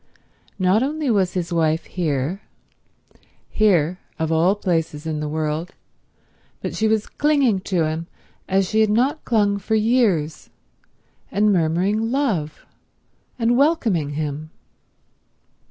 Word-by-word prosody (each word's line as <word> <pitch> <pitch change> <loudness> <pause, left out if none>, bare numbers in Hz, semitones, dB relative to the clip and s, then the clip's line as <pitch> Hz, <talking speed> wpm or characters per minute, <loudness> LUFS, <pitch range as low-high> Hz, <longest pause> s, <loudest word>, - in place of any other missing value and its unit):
Not 190 +3 +3
only 290 0 -1
was 190 -4 +1
his 175 -1 -2
wife 160 -1 +1
here 160 +1 -2 1.1
—here, 185 -5 +2 0.2
of 160 0 -1
all 170 +5 +3
places 165 -6 -2
in 155 -1 -2
the 150 0 -3
world—but 155 +2 -7
she 220 - +1
was 220 0 +1
clinging 280 -9 +2
to 175 -4 +2
him 160 +2 -3 0.4
as 190 0 +2
she 220 +3 +2
had 215 - +3
not 255 +8 +1
clung 205 -3 +2
for 220 +3 -1
years, 215 -9 +1 0.8
and 205 +1 +2
murmuring 185 +6 +1
love, 210 - -1 0.7
and 235 0 +2
welcoming 230 - +1
him. 150 +1 -4
185 Hz, 120 wpm, -21 LUFS, 160-220 Hz, 1.1 s, Not